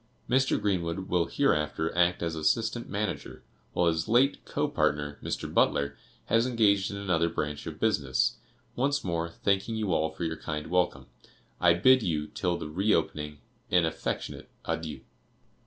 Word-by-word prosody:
Mr. 130 +2 +2
Greenwood 95 -2 -1
will 85 -2 +2
hereafter 80 - 0
act 90 0 +2
as 85 -1 -1
assistant 110 +9 0
manager, 105 +1 -4 0.3
while 90 - +2
his 85 +2 +1
late 125 +5 +3
co - - -1
partner, 75 0 0
Mr. - - -4
Butler, 70 0 +2 0.3
has 115 +2 +3
engaged 105 -5 +3
in 100 - -5
another 85 -4 +1
branch 75 -3 -3
of - - -7
business. 65 -3 +1 0.4
Once 140 +3 +1
more, 85 -2 -1
thanking 100 +5 0
you 105 -5 0
all 80 0 +1
for 80 +2 -7
your 80 -1 -2
kind 75 +1 -5
welcome, 90 0 +1 0.5
I 85 -1 +5
bid 130 +8 +6
you, 80 -7 -1
till 85 +2 -2
the - - -5
re 95 +8 0
opening, 75 -1 -3 0.3
'an 90 -2 +4
affectionate 80 - -4 0.2
adieu. 75 -5 -3
85 Hz, 155 wpm, -28 LUFS, 80-105 Hz, 0.5 s, bid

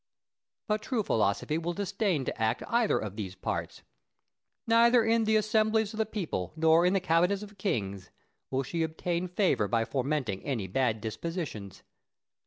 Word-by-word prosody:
But 210 -1 0
true 225 -1 -1
philosophy 110 - 0
will 170 +1 -2
disdain 200 - -1
to 120 - -4
act 110 +2 +1
either 235 -2 +2
of 105 -2 -5
these 95 -3 -5
parts. - - -4 0.8
Neither 235 +1 +5
in 225 0 +2
the 220 0 +3
assemblies 215 0 +2
of 220 - -7
the 220 - +1
people, 170 - -3
nor 160 +2 +4
in 180 - +2
the 195 - +3
cabinets 180 +3 +2
of 205 -1 -13
kings, 100 - -2 0.4
will 135 +1 0
she 165 +6 -3
obtain 170 +2 -2
favour 180 - +1
by 115 +1 +1
fomenting 130 -7 -2
any 120 -8 -2
bad 110 +2 0
dispositions. 110 - -5
170 Hz, 160 wpm, -29 LUFS, -, 0.8 s, Neither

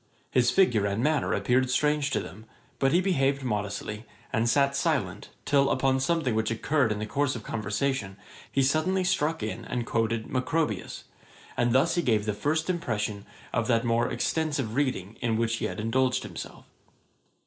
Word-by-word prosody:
His 125 -1 +3
figure 120 - +3
and 100 +4 -1
manner 150 0 +1
appeared 130 +1 +2
strange 150 +2 +2
to - - 0
them; 105 +4 -9 0.3
but 135 0 +3
he 175 - +4
behaved 140 -7 +1
modestly, 105 -1 -3 0.3
and 115 0 +2
sat 140 +1 +3
silent, 130 - -1 0.2
till 140 -1 +3
upon 130 0 +2
something 145 -2 +1
which 110 0 0
occurred 120 +2 +1
in 105 - -1
the 105 - -3
course 140 +5 0
of 115 - -6
conversation, 105 -1 -2 0.3
he 135 - +2
suddenly 155 +7 +2
struck 165 - 0
in 110 - -4
and 120 -1 -3
quoted 115 -1 0
Macrobius; 130 - -2 0.5
and 120 0 +1
thus 135 +7 +3
he 175 - +1
gave 110 -8 +1
the 105 - 0
first 150 +9 -1
impression 110 - -2 0.3
of 115 -2 0
that 115 -2 +2
more 115 0 +1
extensive 145 -8 -1
reading 120 -7 -1
in 115 -2 +1
which 115 0 0
he - - -2
had - - -4
indulged 125 +4 +1
himself. - - -8
125 Hz, 170 wpm, -27 LUFS, 110-145 Hz, 0.5 s, he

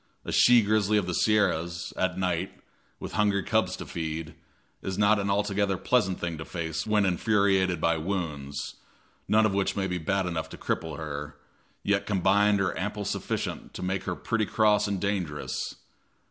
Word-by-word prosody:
A - - -4
she 120 -2 +6
grizzly 105 0 +2
of 105 - +1
the 90 - -3
Sierras, 85 -5 +1
at 95 -1 0
night, 90 -1 -1 0.5
with - - -6
hungry 100 -2 +2
cubs - - +1
to - - -7
feed, 80 -1 -4 0.5
is 95 0 -4
not 105 +1 +4
an 100 0 -1
altogether 100 -1 +1
pleasant 95 -1 +1
thing 85 -2 -3
to - - -4
face 80 +1 -4
when 105 -2 +3
infuriated 95 -2 +2
by 85 +1 +2
wounds, 75 -6 -4 0.5
none 110 +1 +4
of 105 - +1
which 100 0 0
may 100 - 0
be 90 -2 -2
bad 95 +4 0
enough 85 -3 -3
to - - -9
cripple 80 -3 -3
her, 75 -1 -6 0.5
yet 100 0 +1
combined 100 +1 +3
are 95 - 0
amply 105 +2 -3
sufficient - - -3
to - - -5
make 95 +1 -2
her 90 - -2
pretty 110 +2 -1
cross 105 -1 +3
and 100 -2 -1
dangerous. 90 -7 -2
95 Hz, 175 wpm, -27 LUFS, 85-105 Hz, 0.5 s, she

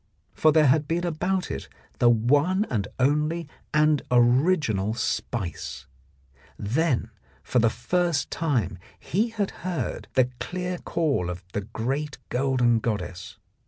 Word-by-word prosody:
For 155 - +4
there 155 0 +5
had 145 +2 +3
been 170 +3 0
about 180 +3 -1
it 70 - -5 0.3
the 120 - +6
one 145 - +3
and 105 -5 0
only 150 +5 +1 0.2
and 150 -1 +3
original 120 - +3
spice; 115 -6 -3 0.7
then 120 0 0 0.3
for 125 - +1
the 115 0 +4
first 165 +7 0
time 130 - -1 0.2
he 215 +7 0
had 210 -3 -2
heard 180 -2 -3
the 130 -1 +3
clear 180 0 -3
call 145 - 0
of 90 +1 -6
the 105 - -1
great 130 +8 -3
golden 125 -3 +2
goddess. 95 -5 -4
140 Hz, 125 wpm, -26 LUFS, 115-165 Hz, 0.7 s, the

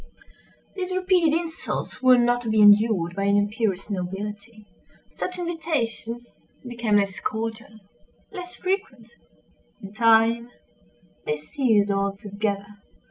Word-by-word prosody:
These 370 -1 -3
repeated 365 -4 +3
insults 325 -5 -5
were 255 -1 +6
not 245 0 +2
to 230 - -4
be 220 0 +2
endured 205 -4 +5
by 200 0 -1
an 200 0 +3
imperious 205 -2 -1
nobility. 205 +3 -6 0.5
Such 365 0 -4
invitations 295 -9 -3 0.4
became 235 -3 0
less 200 -2 +1
cordial—less 225 - -7
frequent—in 240 - -7
time 230 +1 +3 0.8
they 150 - 0
ceased 205 - +1
altogether. 200 +1 -2
225 Hz, 100 wpm, -24 LUFS, 205-255 Hz, 0.8 s, were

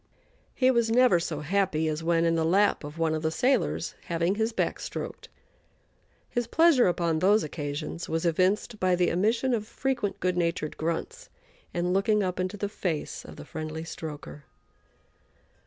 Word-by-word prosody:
He 260 -1 +4
was 235 -2 +2
never 240 -6 +5
so 160 -3 -3
happy 165 -1 +1
as 155 +1 -2
when 165 0 +2
in 165 - +3
the 165 -1 +1
lap 195 +4 +3
of 145 +2 -8
one 165 -1 +1
of 155 - -2
the 160 - +1
sailors, 250 +9 0
having 170 +1 0
his 220 +2 0
back - - -1
stroked. - - -6 1.0
His 240 -2 -2
pleasure 320 - +5
upon 170 -2 +1
those 205 +5 +4
occasions 150 +2 -5
was 165 +1 -1
evinced 185 +6 +1
by 185 -1 +3
the 175 0 +2
emission 225 +8 +1
of 215 -2 -1
frequent 235 -7 -2
good 180 -1 0
natured 170 -3 -1
grunts 170 - -4 0.4
and 175 +1 -1
looking 205 +2 +2
up 185 -1 -2
into 185 +3 -2
the 205 - -2
face 180 -6 -3
of - - -10
the 75 - -10
friendly 155 +1 -5
stroker. 150 -3 -8
180 Hz, 170 wpm, -27 LUFS, 160-215 Hz, 1.0 s, never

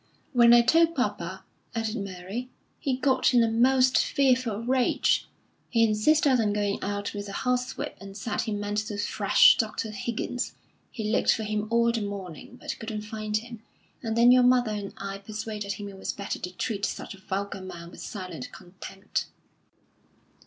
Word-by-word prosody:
"When 235 -2 +6
I 240 0 +8
told 330 +6 +4
papa," 190 -6 -2 0.3
added 225 -1 -1
Mary, 200 +4 -5 0.3
"he 265 -3 -1
got 260 -1 +2
in 240 - +6
a - - +3
most 255 +2 +4
fearful 255 -5 +1
rage. 255 +1 +2 0.4
He 230 -2 +3
insisted 250 +4 +3
on 210 -2 +1
going 205 -1 0
out 205 +1 -3
with 205 -1 -5
a - - -7
horsewhip, 250 0 -2
and 195 0 -9
said 220 +3 -2
he 225 - -3
meant 205 0 -1
to 210 -1 -4
thrash - - +5
Dr. 220 - -2
Higgins. 235 +3 -3 0.4
He 225 - -5
looked - - +3
for 220 - -4
him 215 0 -2
all 235 0 +3
the 230 -1 -2
morning, 200 +1 -7
but - - -5
couldn't 220 -1 -4
find 215 0 -2
him; 235 0 -8 0.4
and 225 -1 -2
then 240 +1 +7
your 250 0 +7
mother 245 -2 +4
and 205 -2 -4
I 195 0 -5
persuaded 210 0 -5
him 205 +1 -7
it 195 -1 -10
was - - -3
better 200 - -4
to 180 - -5
treat 200 +2 -3
such - - -3
a 195 - -14
vulgar 195 +1 -4
man 175 -2 -9
with - - -11
silent 185 - -7
contempt." 195 +2 -6
215 Hz, 175 wpm, -27 LUFS, 200-245 Hz, 0.4 s, I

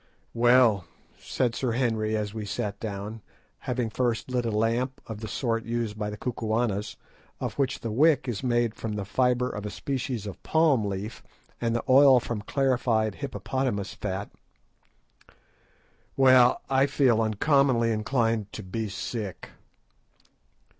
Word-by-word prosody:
"Well," 120 -5 +4 0.3
said 125 -3 -1
Sir 120 +1 -1
Henry, 110 -3 0
as 105 -1 -3
we 110 -1 -5
sat 100 -1 -4
down, 105 +1 -5 0.5
having 120 -3 -1
first 120 0 -1
lit 125 -2 0
a - - 0
lamp 115 +4 0
of 110 -2 -7
the 110 - -6
sort 115 +1 -1
used 115 -2 -2
by 105 -1 -3
the 105 - -6
Kukuanas, 110 -3 -2 0.4
of - - -3
which 135 0 0
the 115 - -3
wick 140 +2 +3
is 120 -5 -3
made 120 -3 +1
from 110 -1 -5
the 105 -1 -3
fibre 125 +3 +1
of 105 -5 -5
a 105 - -4
species 125 0 -3
of 100 - -8
palm 155 -9 +3
leaf, 100 +2 -5 0.4
and 115 -1 0
the 120 - -1
oil 130 0 +7
from 115 -3 -4
clarified 120 -4 +1
hippopotamus 130 -6 -3
fat, 100 0 -4 1.9
"well, 130 -2 +6
I 135 +1 +3
feel 125 -6 +3
uncommonly 115 +1 +2
inclined 115 -1 0
to - - -6
be 105 +4 -4
sick." 100 -2 -5
115 Hz, 145 wpm, -27 LUFS, 105-125 Hz, 1.9 s, oil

